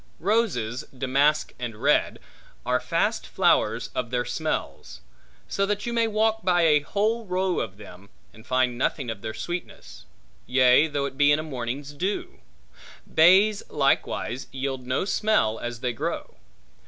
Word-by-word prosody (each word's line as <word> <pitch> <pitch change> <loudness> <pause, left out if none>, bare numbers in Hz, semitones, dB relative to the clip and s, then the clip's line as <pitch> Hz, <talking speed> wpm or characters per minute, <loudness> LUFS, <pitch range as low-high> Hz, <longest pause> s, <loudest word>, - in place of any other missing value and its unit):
Roses, 165 - 0
damask 140 +4 +1
and 120 -3 -5
red, - - +2 0.5
are - - +1
fast - - -1
flowers - - +1
of 120 - -3
their 125 0 -1
smells; - - -4 0.5
so 195 - -1
that 205 0 -2
you 240 - -3
may 230 -1 +2
walk 220 +1 +1
by 175 -1 +3
a 150 -2 +5
whole 215 +9 -1
row 185 0 0
of 95 - -5
them, 100 -1 -13 0.2
and 110 - -15
find 125 0 0
nothing 130 -2 -1
of 105 -3 -8
their 110 -1 -5
sweetness; 60 - -7 0.4
yea 130 +3 +5
though 145 -2 -2
it 135 0 -7
be 145 0 +5
in 145 - +4
a 155 - -3
morning's 140 0 -5
dew. 185 +7 -3 0.7
Bays 195 +6 +5
likewise 135 -3 0
yield 130 -1 -4
no 130 +8 0
smell 195 - +1
as 120 -1 -6
they 125 -2 -1
grow. 110 - -4
140 Hz, 155 wpm, -25 LUFS, 120-185 Hz, 0.7 s, a